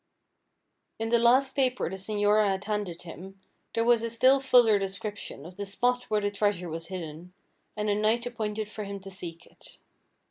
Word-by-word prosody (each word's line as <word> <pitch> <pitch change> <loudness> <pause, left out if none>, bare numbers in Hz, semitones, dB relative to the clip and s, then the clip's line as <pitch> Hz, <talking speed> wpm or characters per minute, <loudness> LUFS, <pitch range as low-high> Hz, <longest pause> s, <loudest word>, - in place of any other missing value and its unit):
In 225 0 -2
the 235 0 +4
last 260 +3 +4
paper 255 -2 +1
the 190 - -4
señora 205 +1 +2
had 195 0 -1
handed 205 -5 -3
him, 185 +3 -10 0.4
there 230 - +2
was 235 -1 +4
a 230 - -2
still 255 +4 +4
fuller 245 -6 +5
description 195 -5 -5
of 180 +2 -11
the 200 - -4
spot 245 +5 0
where 215 -1 0
the 205 0 0
treasure 200 -4 0
was 165 +1 -5
hidden, 175 -1 -7 0.4
and 210 0 -1
a 205 - +3
night 215 +3 +1
appointed 215 -3 -3
for 215 0 -6
him 200 0 -6
to 195 0 -9
seek 170 -2 -8
it. - - -16
210 Hz, 185 wpm, -28 LUFS, 190-230 Hz, 0.4 s, fuller